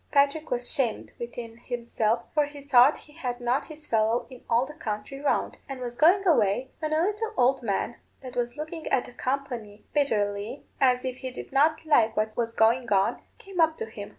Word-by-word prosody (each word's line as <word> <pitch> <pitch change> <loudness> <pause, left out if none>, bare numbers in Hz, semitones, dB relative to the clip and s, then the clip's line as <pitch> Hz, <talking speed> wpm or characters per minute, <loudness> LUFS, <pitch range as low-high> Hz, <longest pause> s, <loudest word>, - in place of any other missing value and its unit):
Patrick 285 +2 +2
was 245 0 -1
'shamed 245 -6 -1
within 235 -1 -7
himself, 235 -2 -1
for 300 -2 +3
he 290 -1 -11
thought 270 0 +6
he 295 - -17
had 250 -6 -4
not 245 +2 0
his 310 -2 -9
fellow 225 0 +1
in 255 - -12
all 235 +2 +3
the 300 - -10
country 225 -2 -5
round; 285 - 0
and 270 -1 -5
was 245 -1 -5
going 360 +8 +5
away, 260 - +3
when 310 -1 -2
a 310 +1 +3
little 425 +3 -1
old 260 +2 +3
man, 230 +1 -1 0.2
that 255 -2 -9
was 240 +2 -2
looking 315 +1 -6
at 245 - +1
the - - -12
company 245 -6 -4
bitterly, 210 -4 0
as 250 -1 +3
if 255 -1 -3
he 260 - -5
did 255 - -9
not 305 +4 +3
like 240 -8 +3
what 215 0 0
was 230 -1 -2
going 230 +2 +3
on, 195 -1 +2 0.2
came 390 -6 -3
up 320 0 +3
to - - -3
him. 210 -2 -8
255 Hz, 205 wpm, -27 LUFS, 230-295 Hz, 0.2 s, thought